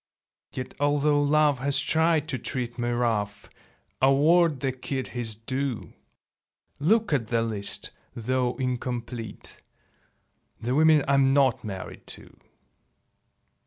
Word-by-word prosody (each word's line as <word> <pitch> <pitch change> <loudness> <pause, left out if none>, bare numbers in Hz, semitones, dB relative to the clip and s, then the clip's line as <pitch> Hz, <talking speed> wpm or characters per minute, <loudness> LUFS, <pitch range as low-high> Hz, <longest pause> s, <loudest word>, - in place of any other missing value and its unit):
Yet 130 -1 -6
although 145 0 +2
Love 145 -1 +3
has 140 +2 +2
tried 160 -1 +2
to 130 - -2
treat 120 -2 -4
Me 120 0 0
rough, 110 -4 -1 0.5
award 150 +2 +4
the 135 - 0
kid 130 0 -4
his 115 -2 -4
due. 130 +2 -4 0.9
Look 210 +5 +2
at 120 -6 0
the 115 0 +1
list, 105 -3 -1 0.2
though 125 +1 -1
incomplete: 125 -3 -4 1.0
The 120 +2 -2
women 155 0 +5
I'm 135 -1 +4
not 135 -4 +3
married 95 -4 -7
to. - - -16
130 Hz, 115 wpm, -26 LUFS, 120-145 Hz, 1.0 s, women